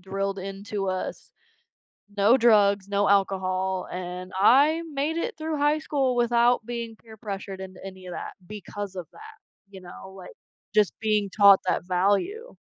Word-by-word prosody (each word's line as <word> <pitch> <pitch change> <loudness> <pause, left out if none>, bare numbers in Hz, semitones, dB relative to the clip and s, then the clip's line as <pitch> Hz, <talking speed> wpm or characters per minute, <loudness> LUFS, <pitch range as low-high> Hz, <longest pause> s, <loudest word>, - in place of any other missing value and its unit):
drilled 195 +1 -3
into 195 +1 -5
us, 185 0 -4 0.9
no 210 +5 +5
drugs, 205 -5 +3
no 200 0 +1
alcohol, 190 -1 0
and 180 0 -6
I 285 - +5
made 285 +3 -1
it 450 +8 -3
through 315 -1 -3
high 295 +1 +2
school 270 -4 0
without 240 0 +3
being 235 -2 -6
peer 220 -1 -15
pressured 195 -2 -7
into 185 -1 -9
any 190 -1 -10
of 180 - -7
that - - -6
because 205 0 -7
of 175 - -6
that, 435 0 -13 0.3
you 195 - -11
know, 185 +1 -11
like, 180 - -12 0.4
just 210 -2 +4
being 215 -2 0
taught 200 0 +6
that 180 - -1
value. 205 - 0
200 Hz, 155 wpm, -25 LUFS, 190-240 Hz, 0.9 s, taught